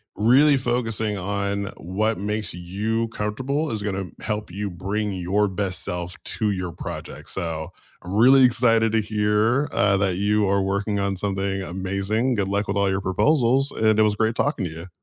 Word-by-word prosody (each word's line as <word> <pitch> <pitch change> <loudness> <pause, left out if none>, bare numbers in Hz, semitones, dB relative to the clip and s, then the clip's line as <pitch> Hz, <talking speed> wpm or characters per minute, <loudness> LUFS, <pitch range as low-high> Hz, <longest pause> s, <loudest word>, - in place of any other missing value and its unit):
really 135 +7 +5
focusing 115 -4 -1
on 100 +1 -2
what 105 +6 -1
makes 105 -1 -2
you 105 +6 -2
comfortable 130 +9 -2
is 105 -2 -3
gonna 100 -2 -2 0.2
help 105 -3 -3
you 100 +2 -3
bring 100 +4 -3
your 95 +3 0
best 95 -1 -3
self 90 0 -4
to 105 -1 -1
your 90 -2 -3
project, - - -7
so 80 -4 -3 0.3
I'm 90 +3 -5
really 130 +4 +7
excited 115 -2 +3
to 110 - +3
hear, 105 +6 +1
uh, 100 0 +3
that 95 -2 +1
you 105 +1 +1
are 100 0 +2
working 100 +1 -1
on 100 -1 -1
something 95 0 -2
amazing. 100 +7 -1
Good 100 -2 0
luck 100 +1 -1
with 100 - 0
all 100 -1 +2
your 95 +1 -1
proposals, 130 - +2
and 110 -1 +2
it - - +6
was 105 -1 +2
great 110 +1 0
talking 145 -9 0
to 80 - -4
you. 85 +3 -9
105 Hz, 180 wpm, -23 LUFS, 95-110 Hz, 0.3 s, really